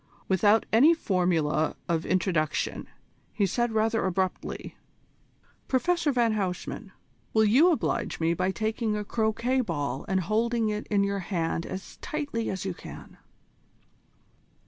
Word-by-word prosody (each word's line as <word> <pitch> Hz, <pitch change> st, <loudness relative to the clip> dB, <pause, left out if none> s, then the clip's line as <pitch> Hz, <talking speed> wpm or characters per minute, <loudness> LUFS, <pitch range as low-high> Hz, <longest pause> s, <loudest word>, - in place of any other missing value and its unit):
Without 205 Hz, +4 st, +4 dB
any 290 Hz, +9 st, +7 dB
formula 175 Hz, -, +1 dB
of 165 Hz, -1 st, -1 dB
introduction, 170 Hz, -4 st, 0 dB, 0.4 s
he 205 Hz, -, +1 dB
said 240 Hz, +5 st, 0 dB
rather 225 Hz, +1 st, +1 dB
abruptly: 185 Hz, 0 st, -2 dB, 0.9 s
"Professor 315 Hz, +3 st, +1 dB
van 235 Hz, -4 st, +2 dB
Huysman, 190 Hz, -4 st, -3 dB, 0.4 s
will 220 Hz, -, +5 dB
you 265 Hz, +12 st, +6 dB
oblige 320 Hz, -, -1 dB
me 165 Hz, 0 st, +2 dB
by 185 Hz, +2 st, 0 dB
taking 220 Hz, +2 st, -1 dB
a 210 Hz, -, -4 dB
croquet 230 Hz, +4 st, 0 dB
ball 145 Hz, -, -3 dB
and 190 Hz, -1 st, +1 dB
holding 225 Hz, +4 st, +1 dB
it 210 Hz, 0 st, -3 dB
in 200 Hz, -2 st, +2 dB
your 200 Hz, 0 st, -1 dB
hand 170 Hz, -3 st, -2 dB
as 190 Hz, +1 st, -7 dB
tightly 290 Hz, -9 st, -3 dB
as 190 Hz, 0 st, -4 dB
you 190 Hz, -, -2 dB
can?" -, -, -11 dB
210 Hz, 130 wpm, -27 LUFS, 180-230 Hz, 0.9 s, any